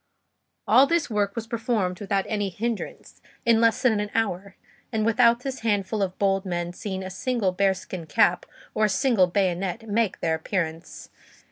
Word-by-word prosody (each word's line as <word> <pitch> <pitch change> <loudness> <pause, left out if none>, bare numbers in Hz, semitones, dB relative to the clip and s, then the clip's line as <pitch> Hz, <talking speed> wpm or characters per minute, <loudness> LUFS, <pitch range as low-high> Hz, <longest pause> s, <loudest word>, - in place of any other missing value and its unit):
All 270 +2 +6
this 335 -5 0
work 205 -1 0
was 230 -1 -4
performed 225 -6 -1
without 195 -1 -1
any 205 -2 -1
hindrance, 225 +4 -5 0.2
in 230 -1 +4
less 230 +2 +2
than 225 -5 +3
an 210 0 -2
hour, 200 -3 -1 0.4
and 220 -2 0
without 235 +1 +4
this 270 0 -5
handful 210 -1 -1
of 190 -1 -2
bold 195 -1 +1
men 175 -2 -3
seeing 190 0 -5
a 185 - -6
single 220 0 -1
bear 195 +1 +2
skin 180 -3 -8
cap 175 +3 +2 0.3
or 215 - +2
a - - +1
single 210 -2 +3
bayonet 190 +3 -1
make 215 -1 0
their 160 - 0
appearance. 165 0 -4
205 Hz, 170 wpm, -25 LUFS, 185-230 Hz, 0.4 s, All